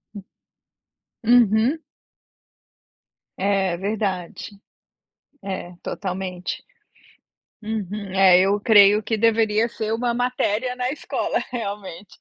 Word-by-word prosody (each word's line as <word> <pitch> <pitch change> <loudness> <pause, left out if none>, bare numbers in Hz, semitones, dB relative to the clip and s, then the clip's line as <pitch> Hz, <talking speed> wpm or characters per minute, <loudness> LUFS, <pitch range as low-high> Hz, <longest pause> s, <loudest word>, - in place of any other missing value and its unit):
Hum. 200 - -8 1.0
Uhum. 235 +4 +4 1.6
É, 190 -2 0
verdade. 195 -2 -3 0.9
É, 190 -2 -5
totalmente. 185 -2 -5 1.0
Uhum, 210 -2 -5
é 190 -2 +6
eu 200 +2 +2
creio 210 -1 +6
que 220 +1 -1
deveria 220 0 +2
ser 220 -1 -4
uma 235 +1 -1
matéria 250 0 -1
na 250 +1 -1
escola 300 - -2
realmente. 205 -5 -7
210 Hz, 90 wpm, -22 LUFS, 195-230 Hz, 1.6 s, é